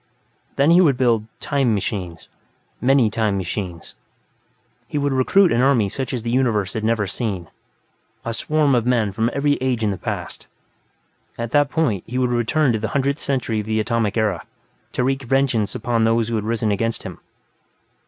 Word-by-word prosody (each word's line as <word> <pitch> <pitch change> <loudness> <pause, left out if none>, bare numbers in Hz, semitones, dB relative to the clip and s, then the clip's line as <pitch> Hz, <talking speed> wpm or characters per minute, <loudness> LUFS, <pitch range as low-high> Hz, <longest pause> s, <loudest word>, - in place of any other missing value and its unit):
Then, 140 +4 +4
he 175 +2 +7
would 145 -8 +3
build 115 -4 +2
"time 135 -6 +1
machines", 90 -4 -4 0.5
many 130 -2 +4
"time 110 -3 0
machines". 90 -2 -5 0.9
He - - -4
would 145 -1 0
recruit 175 +8 +4
an 120 - +2
army 125 -7 +3
such 130 +4 -4
as 125 -4 -3
the 115 - -2
universe 115 -7 +1
had 110 - -3
never 110 -1 +1
seen, 95 -4 -4 0.8
a 115 - -2
swarm 150 +3 +1
of 120 -1 +1
men 115 -5 +2
from 110 +4 0
every 145 +2 +1
age 125 -3 0
in 105 - +1
the 95 - -5
past. - - -5 0.9
At 115 -1 -4
that 145 0 +3
point, 130 - 0
he 125 - -4
would 125 -1 +1
return 120 +3 +2
to 110 - -1
the 110 - -2
Hundredth 140 +2 0
Century 125 -5 -1
of 105 - -5
the 110 0 0
Atomic 115 -1 0
Era, 105 -6 0 0.5
to 125 - 0
wreak 135 +1 0
vengeance 130 -5 0
upon 115 0 0
those 115 0 +2
who 115 - -1
had 105 -1 -2
risen 110 -1 0
against 115 +3 -1
him. - - -8
115 Hz, 185 wpm, -21 LUFS, 110-135 Hz, 0.9 s, he